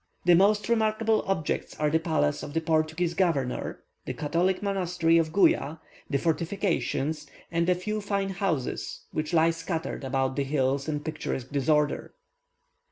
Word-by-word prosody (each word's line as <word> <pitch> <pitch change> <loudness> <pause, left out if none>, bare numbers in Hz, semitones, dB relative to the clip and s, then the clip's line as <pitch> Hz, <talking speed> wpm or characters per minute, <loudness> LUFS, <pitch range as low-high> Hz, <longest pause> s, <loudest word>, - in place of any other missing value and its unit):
The 175 - +7
most 200 +3 +4
remarkable 220 -1 +2
objects 175 -6 -1
are 150 -1 +2
the 160 - +3
palace 160 - 0
of 145 - -7
the - - +3
Portuguese 160 +2 0
governor, 160 -8 -1 0.2
the - - -3
Catholic 175 +6 0
monastery 180 -4 +2
of 160 -1 0
Guia, 160 -5 +3 0.3
the 140 - +1
fortifications, 165 -2 -1 0.2
and 170 +1 +1
a 180 - +4
few 210 +4 -3
fine 200 -1 -1
houses 180 -9 -2
which 155 +1 -2
lie 165 -1 +4
scattered 165 -2 -4
about 135 0 -1
the 140 - +2
hills 135 0 0
in 150 -1 -2
picturesque 135 -4 -4
disorder. 150 +1 +1
165 Hz, 150 wpm, -27 LUFS, 150-190 Hz, 0.3 s, The